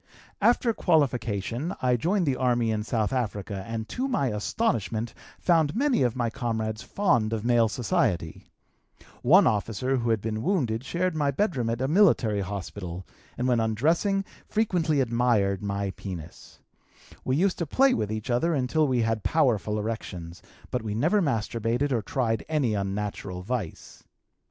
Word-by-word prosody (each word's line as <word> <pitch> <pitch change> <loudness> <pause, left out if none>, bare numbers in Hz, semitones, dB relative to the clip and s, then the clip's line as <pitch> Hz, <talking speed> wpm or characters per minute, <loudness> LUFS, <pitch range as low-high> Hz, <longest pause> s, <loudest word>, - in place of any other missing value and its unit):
"After 235 +2 +3
qualification 130 - 0
I 125 -1 +2
joined 175 - +1
the 135 -3 +1
army 120 -3 +1
in 110 -1 -1
South 110 +1 -1
Africa 100 -5 -3
and 115 -1 -4
to 260 +2 -2
my 205 - 0
astonishment 115 - -1 0.2
found 160 -3 +2
many 275 - +2
of 125 -2 +1
my 120 -2 -1
comrades 110 -4 -2
fond 120 - +1
of 110 0 -3
male 120 -2 +4
society; 105 - -1 0.8
one 180 +11 +6
officer 110 +5 0
who 120 -1 -1
had 110 -1 +2
been 110 +1 -3
wounded 130 - 0
shared 175 +5 -1
my 145 -2 +1
bedroom 140 - 0
at 115 +2 -2
a 130 - +1
military 140 - +3
hospital 95 -2 -6 0.3
and 125 - 0
when 125 -2 +3
undressing 165 - +1 0.2
frequently 175 -9 +1
admired 115 -6 +1
my 100 -1 -2
penis; 90 -6 -9 0.7
we 130 - 0
used 185 +4 +1
to 170 - -2
play 270 - +4
with 105 - -1
each 110 +3 -3
other 160 +8 +2
until 145 +4 +1
we 125 -3 +1
had 115 -1 0
powerful 115 - +1
erections, 90 -6 -5 0.3
but - - -1
we 105 -2 -4
never 165 - +2
masturbated 120 - 0
or 120 -3 +1
tried 115 0 -1
any 145 -8 +1
unnatural 100 -2 -3
vice. 105 -6 -5
120 Hz, 155 wpm, -26 LUFS, 110-150 Hz, 0.8 s, one